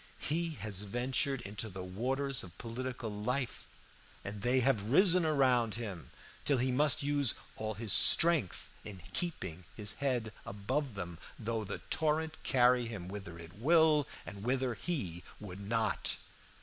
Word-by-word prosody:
He 165 +2 -1
has 105 -3 -4
ventured 125 +5 0
into 105 0 -3
the 95 -1 -7
waters 130 +8 -1
of 85 -2 -12
political 125 -1 -5
life, 125 +5 -2 0.6
and 100 0 -5
they 125 +3 +3
have 115 -5 +1
risen 180 - +6
around 130 -7 +3
him 105 -8 -6 0.3
till 140 - +2
he 130 +1 +1
must 145 +2 +3
use 145 -2 +2 0.2
all 110 0 -3
his 110 -1 -2
strength 160 - +5 0.2
in 100 -3 -8
keeping 125 - -3
his 105 -2 -1
head 125 -6 -1
above 125 +6 -3
them, 85 -3 -6 0.2
though 115 0 -2
the 100 - -5
torrent 160 0 +1
carry 125 -2 +3
him 100 -6 -6
whither 95 -4 -7
it 85 0 -11
will 155 +4 +4 0.2
and 100 0 -8
whither 130 +1 0
he 110 - -3 0.2
would 95 -2 -8
not. 110 +1 0
120 Hz, 150 wpm, -33 LUFS, 100-140 Hz, 0.6 s, risen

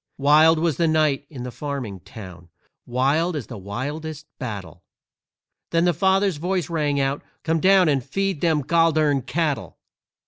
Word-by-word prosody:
Wild 155 +3 +5
was 160 -2 0
the 170 - +2
night 155 -3 +1
in 130 -5 -8
the 125 - -5
farming 130 -9 -5
town, 90 -3 -12 0.4
Wild 140 +8 +1
as 140 -6 -4
the 120 - -9
wildest 145 +10 -5
battle, 105 -8 -6 0.9
Then 165 +1 +2
the 175 - +3
father's 190 +1 +2
voice 175 0 -2
rang 150 -3 0
out, 135 +1 0 0.2
"Come 165 0 +1
down 190 0 +5
And 140 -4 +1
feed 195 +1 -2
them 160 -3 +2
gol 165 +3 +3
dern 145 -3 +2
cattle!" 145 +3 -2
150 Hz, 160 wpm, -23 LUFS, 130-165 Hz, 0.9 s, Wild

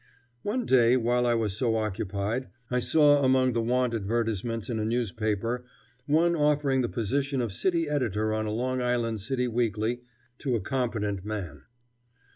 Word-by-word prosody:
One 235 +4 -2
day, 125 -1 +5
while 120 0 +1
I 120 - +3
was 110 -4 -1
so 115 0 +1
occupied, 105 +2 -2 0.2
I 125 - +2
saw 145 +1 +4
among 130 -1 +3
the 115 - +1
"want" 125 +1 +1
advertisements 115 0 -2
in 115 -3 -2
a - - -1
newspaper 115 +1 -1 0.4
one 165 +3 +3
offering 145 -3 +2
the 120 - -1
position 135 +4 -1
of 115 -5 -2
city 170 - 0
editor 110 -7 0
on 110 0 -1
a - - -2
Long 130 +3 -1
Island 120 -3 0
City 125 +4 -1
weekly 115 0 -1 0.4
to 130 -4 -1
a - - +1
competent 105 -4 -2
man. 95 -10 -6
120 Hz, 160 wpm, -27 LUFS, 110-130 Hz, 0.4 s, day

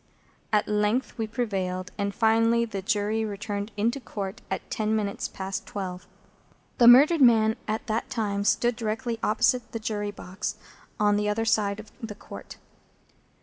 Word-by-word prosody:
At 210 -1 +2
length 210 +4 0
we 220 - -1
prevailed, 190 -5 -2
and 200 -1 -1
finally 230 +2 +3
the 200 -4 -5
Jury 215 +2 0
returned 205 0 -4
into 235 +6 +1
Court 205 -2 -6
at - - -4
ten 215 0 0
minutes 205 -2 -2
past 190 0 -5
twelve. 185 -3 -5 0.7
The 235 - +7
murdered 285 +6 +8
man 220 -3 +5
at 215 +1 -2
that 225 -1 -2
time 205 -3 -1
stood 240 +3 +2
directly 230 +1 -3
opposite 235 +2 +1
the 230 - -2
Jury 210 -1 -2
box, 200 0 -5 0.4
on 205 -1 +3
the 210 0 0
other 225 +2 0
side 210 -2 +1
of 215 - -11
the 220 -3 -6
Court. - - -10
215 Hz, 155 wpm, -26 LUFS, 205-230 Hz, 0.7 s, murdered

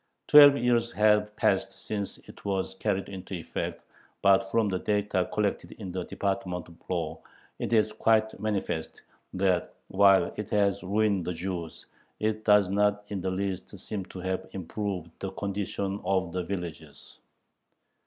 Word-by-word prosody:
Twelve 145 -1 +9
years 120 -2 +2
have 105 0 +3
passed 95 -3 +1
since 100 +1 -4
it - - -14
was 95 -1 -1
carried 95 0 -1
into 95 0 -7
effect, 85 - -5 0.4
but 95 0 +5
from 115 0 +2
the 95 -2 -1
data 105 -3 0
collected 105 -1 -1
in 95 -5 -7
the 90 0 -3
Department 90 -3 -2
of 85 - -14 0.2
Law 80 -3 -2 0.4
it - - -3
is 110 -2 +3
quite 110 -2 +2
manifest, 100 -6 -3 0.3
that, 90 -2 0
while 100 0 +5
it 105 0 -4
has 100 -2 +2
ruined 100 -1 +1
the 90 - -2
Jews, 85 -1 -5 0.3
it 110 0 -1
does 105 -2 +5
not 105 +1 +1
in 100 -2 -3
the 95 - -1
least 95 0 -3
seem 105 -3 -4
to 95 - -10
have 95 0 -3
improved 95 -2 -4
the 95 - -3
condition 100 0 -3
of 95 -3 0
the 90 0 -1
villagers. 85 -6 -7
100 Hz, 155 wpm, -28 LUFS, 95-105 Hz, 0.4 s, Twelve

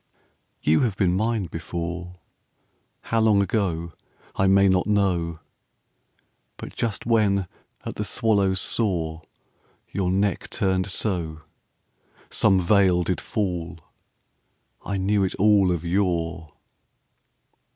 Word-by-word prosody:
You 80 +1 +4
have 110 -6 0
been 90 -4 +2
mine 110 0 0
before, 85 +1 -5 0.9
How 115 - 0
long 110 -2 +4
ago 85 -5 -2 0.4
I 95 - +2
may 100 +1 +5
not 95 0 +2
know: 90 -6 0 1.2
But - - -9
just 110 -4 -3
when 105 -4 +2 0.4
at - - -6
the 105 - -1
swallow's 100 -3 +1
soar 85 -8 -1 0.7
Your 95 -2 -1
neck 100 -1 0
turned 95 -1 0
so, 85 -6 -2 0.9
Some 95 -3 +3
veil 90 -1 +3
did 90 0 -2
fall 90 -6 -3 1.1
I 100 - -3
knew 100 +1 +1
it 95 - -1
all 100 -2 +4
of 85 -1 -2
yore. 85 -3 -1
95 Hz, 110 wpm, -24 LUFS, 85-100 Hz, 1.2 s, may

